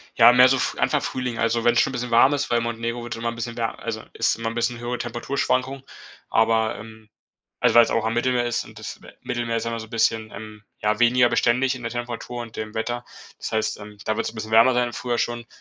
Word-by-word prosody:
Ja, 120 - +8
mehr 125 +1 +8
so, 135 - +3
F - - -1
Anfang - - +2
Frühling, 125 -3 -3
also 115 0 +1
wenn's 120 0 +4
schon - - 0
'n - - -10
bisschen 120 -1 -4
warm 130 +5 +6
ist, 140 -3 -1
weil 120 -1 +2
Montenegro 115 +1 -3
wird 120 -1 -5
immer 115 +1 -2
'n 115 - -6
bisschen 120 0 -5
wär 115 -1 -2
also 110 -1 -5
ist 115 - +1
immer 115 0 -3
'n 115 - -7
bisschen 120 0 -1
höhere 120 +1 -3
Temperaturschwankung, 130 +2 -2 0.5
aber, 110 0 +2
ähm, 110 0 -12 0.5
also - - +3
weil's 120 -1 +7
auch 115 - 0
am 115 - 0
Mittelmeer 120 0 +1
ist 120 - -1
und - - -13
das, - - -7
äh, - - -13
Mittelmeer 120 -1 -2
ist 115 - -2
immer 115 -1 -3
so 110 - -9
bisschen, 110 -1 0
ähm, 105 0 -10 0.2
ja 105 0 0
weniger 120 +1 +4
beständig 125 +3 +2
in 125 - -9
der 115 0 -4
Temperatur 120 0 -5
und 115 -1 -11
dem 110 -1 -5
Wetter. 120 +2 -3 0.3
Das - - -6
heißt, 110 -1 -1
ähm, 105 0 -11
da 110 - -1
wird's - - -2
'n - - -18
bisschen 110 0 -6
wärmer 115 +3 +6
sein 125 0 +2
im 120 - -9
Frühjahr 120 -1 -2
schon 120 0 -2
120 Hz, 250 wpm, -23 LUFS, 115-120 Hz, 0.5 s, Ja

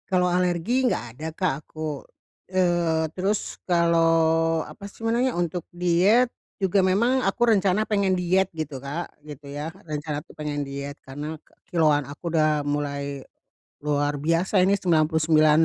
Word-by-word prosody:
Kalau 180 -2 +3
alergi, 180 +8 +1
enggak 235 - 0
ada, 155 - -5
Kak, 185 -4 +1
aku. 155 -3 -5 0.5
Eee, 175 -3 +2
terus 195 +3 -2
kalau 165 -1 +3
apa 200 - -10
sih 225 - -14
namanya, 240 +3 +1
untuk 175 0 -1
diet 180 +8 +3 0.3
juga 195 +1 +3
memang 235 +8 +2
aku 195 +5 -1
rencana 200 -1 +3
pengen 200 -3 +2
diet 185 +2 +2
gitu, 155 -3 -4
Kak, 145 +5 -5
gitu 145 -1 -10
ya. 145 +2 -4 0.2
Rencana 150 -1 -4
tuh - - -16
pengen 150 -1 -3
diet, 140 +1 -6
karena 145 +4 -6 0.3
kilograman 155 -4 +3
aku 160 +4 -6
udah 155 -2 +3
mulai 140 -1 -3 0.6
luar 145 0 0
biasa, 165 +6 +2
ini 200 +2 +3
99 155 -2 +3
165 Hz, 140 wpm, -25 LUFS, 150-185 Hz, 0.6 s, Kalau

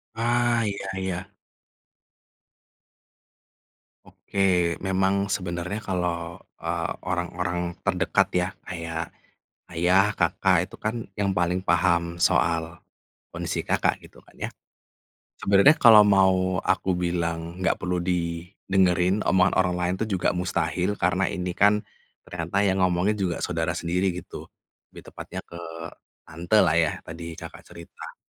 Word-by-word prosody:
Ah, 120 +1 +1
iya 100 -1 -5
iya. 95 +1 -4 2.7
Oke. 90 -3 0
Memang 95 +1 +1
sebenernya 90 +2 -3
kalau, 85 -4 -3 0.2
eee, - - -2 0.2
orang-orang 90 -1 -2 0.2
terdekat 95 +1 +2
ya, 90 0 +2 0.2
kayak 85 -2 -4 0.7
ayah, 95 +5 +3
kakak 95 -2 +2
itu - - -11
kan 110 +1 -2 0.2
yang 100 -1 0
paling 90 +1 +1
paham 85 -1 +1
soal 85 -1 +1 0.6
kondisi - - -3
Kakak - - +1
gitu - - -16
kan - - -23
ya. - - -4 0.9
Sebenernya 100 +10 +5
kalo 115 -3 +8
mau 95 -2 +3
aku 95 -1 +1
bilang 85 -1 -2
nggak 95 - +1
perlu 90 0 -1
didengerin 90 +2 0
omongan 95 0 +4
orang 90 -1 +1
lain 90 +1 0
tuh 110 - -1
juga 95 -4 0
mustahil 90 +2 -1
karena 90 +2 +2
ini 90 -1 -3
kan 105 +3 +3 0.4
ternyata 85 +2 -5
yang 95 0 +1
ngomongin 90 +3 +2
juga 90 -3 -1
saudara 85 -2 -1
sendiri 90 +3 0
gitu, 90 -1 -9 0.4
lebih - - -12
tepatnya - - -7
ke 85 - -11 0.7
tantelah 85 +1 +2
ya, 80 -2 +2
tadi 85 0 -8
cakak - - -10
cerita. 85 0 -11
90 Hz, 120 wpm, -25 LUFS, 85-95 Hz, 2.7 s, kalo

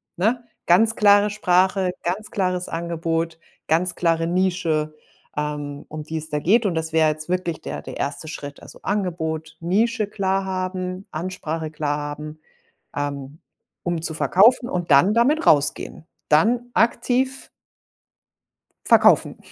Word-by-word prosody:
ne? 230 +7 0 0.2
Ganz 220 +6 +4
klare 205 0 +5
Sprache, 190 -2 +2
ganz 195 +5 -3
klares 185 -2 -1
Angebot, 165 -1 -2 0.3
ganz 175 +3 +2
klare 165 -1 +1
Nische, 170 -4 0 0.4
ähm, 145 -1 -4
um 155 0 -6
die 160 +1 -7
es 160 0 -5
da 150 0 -1
geht. 215 +9 +3
Und 190 - +1
das 160 0 -2
wäre 160 -1 +4
jetzt 155 +1 -4
wirklich 180 -2 -2
der - - -6
der - - -9
1. 145 +2 -3
Schritt. 145 -2 -8
Also, - - -13
Angebot, 160 -5 -3
Nische 215 +6 0
klar 195 -1 -1
haben, 185 0 -4
Ansprache 160 -2 -4
klar 150 -1 -2
haben, 150 +1 -7 0.6
ähm, 145 0 -5 0.4
um 175 -2 -2
zu 160 - +1
verkaufen 225 +10 +4
und 175 -2 -3
dann 160 +9 +6
damit 285 +8 +2
rausgehen. 150 +2 +2 0.2
Dann 235 +11 +3
aktiv 255 +3 0 1.4
verkaufen. - - +5
175 Hz, 135 wpm, -22 LUFS, 155-195 Hz, 1.4 s, dann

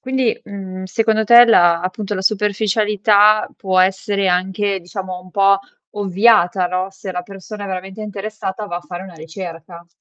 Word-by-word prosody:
quindi, 260 -3 -1
uhm, 190 -2 -8
secondo 220 +3 0
te 235 +2 +8
la 175 -7 +4
appunto 195 +3 -4
la 190 - -3
superficialità 210 +1 +2
può 185 -2 -1
essere 195 +1 +1
anche 190 +2 -1
diciamo 185 0 -7
un 185 - -17
po' 195 +1 +3 0.4
ovviata, 195 -2 +3
no? 185 +1 -2
Se 190 0 -8
la 180 0 -4
persona 200 +2 -9
è - - -6
veramente 190 +2 -6
interessata 210 -1 -6
va 175 - -5
a - - -5
fare 175 0 -8
una 185 -2 -12
ricerca. 170 +1 -9
195 Hz, 160 wpm, -18 LUFS, 185-210 Hz, 0.4 s, te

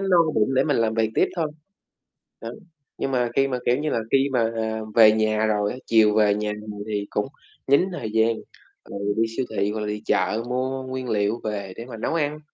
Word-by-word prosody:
no 195 -2 +3 0.2
bụng 110 +5 +2
để 130 - +3
mình 145 -3 +1
làm 110 -1 +1
việc 110 -1 +1
tiếp - - +3
thôi. 165 -3 +1 1.0
Đó, - - -5 0.5
nhưng 135 - -2
mà 125 -2 +1
khi 135 0 +3
mà, 130 -2 -2
kiểu 125 - +3
như 150 +1 -2
là, - - 0
khi 135 +1 +3
mà 115 -2 +2 0.4
về 110 -2 +8
nhà 110 0 +1
rồi 105 -1 +1
á, - - -6
chiều 110 -2 +4
về 105 -2 +4
nhà 105 0 -2
rồi 105 -1 -7
thì 105 -1 -2
cũng 105 - -1 0.4
dính 140 +8 +4
thời 110 -11 -5
gian, 110 +1 +3 0.5
rồi 100 - -6 0.2
đi 115 - +3
siêu 130 - 0
thị 100 +1 +1
hoặc 110 0 -4
là 105 - -3
đi 105 0 -4
chợ 110 +2 +1
mua 130 +1 -2
nguyên 130 -1 -5
liệu 105 +2 0
về 100 -3 -4
để 115 - -7
mà 120 -2 -9
nấu 110 - -2
ăn. 150 -2 -1
115 Hz, 225 wpm, -24 LUFS, 105-130 Hz, 1.0 s, về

